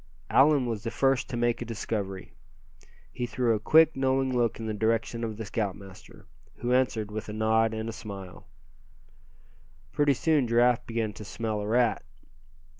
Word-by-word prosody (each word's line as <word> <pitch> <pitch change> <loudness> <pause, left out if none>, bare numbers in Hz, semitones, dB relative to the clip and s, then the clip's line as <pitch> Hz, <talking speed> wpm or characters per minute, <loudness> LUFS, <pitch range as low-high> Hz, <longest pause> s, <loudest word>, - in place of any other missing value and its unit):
Allan 140 -1 +5
was 115 -4 -3
the 115 - -3
first 135 +2 +1
to 120 - -3
make 120 0 0
a - - 0
discovery. 105 -4 -4 0.8
He 120 - -4
threw 120 0 +1
a 110 - 0
quick, 160 +7 +5
knowing 135 -1 +1
look 120 -2 0
in 115 - -5
the 110 - -2
direction 115 +2 -1
of 110 -2 -4
the 110 - -5
scoutmaster, 100 -3 -6 0.3
who 120 +1 -2
answered 115 -5 +1
with 110 +1 -5
a - - -5
nod 110 +1 +2
and 110 0 -4
a - - -3
smile. 100 -7 -9 1.4
Pretty 145 -2 +2
soon 150 -3 +2
Giraffe 120 +1 +3
began 115 -2 -2
to 105 - -9
smell 110 0 -3
a 105 - -4
rat. 120 +1 +2
115 Hz, 170 wpm, -27 LUFS, 110-125 Hz, 1.4 s, Allan